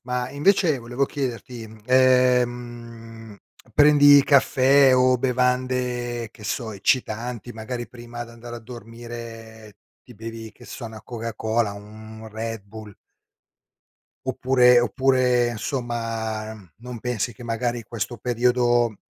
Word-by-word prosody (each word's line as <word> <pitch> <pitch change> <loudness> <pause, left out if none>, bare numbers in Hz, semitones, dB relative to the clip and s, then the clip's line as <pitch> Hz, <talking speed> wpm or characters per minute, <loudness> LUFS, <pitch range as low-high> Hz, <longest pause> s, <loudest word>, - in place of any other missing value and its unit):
Ma 125 0 -3
invece 155 0 +2
volevo 120 +3 -1
chiederti, 125 -4 -5
mhmm, 110 0 -15
ehm, 120 -3 +1 0.4
prendi 145 -1 +7
caffè 135 -1 +5
o 125 0 +4
bevande, 125 -2 -1
che 110 -2 -15
so, 110 +1 -3
eccitanti, 120 +3 -1
magari 120 +2 -6
prima 120 0 -8
d'andare 120 0 -10
a - - -7
dormire 115 -2 -10 0.3
ti 125 - -15
bevi, 115 0 -8
che - - -17
so, 120 - -8
una 110 -1 -10
Coca 115 -2 -6
Cola, 110 -1 0
un 110 +2 -11
Red 110 0 -5
Bull. 105 0 -11 1.3
Oppure 125 -1 +4
oppure 125 0 +2
insomma 115 -2 -3
uhm, 100 -7 -15
non 125 +1 -8
pensi 120 0 -2
che 120 - -12
magari 120 +1 -2
questo 120 +1 -5
periodo, 120 -1 +1
120 Hz, 120 wpm, -23 LUFS, 115-125 Hz, 1.3 s, prendi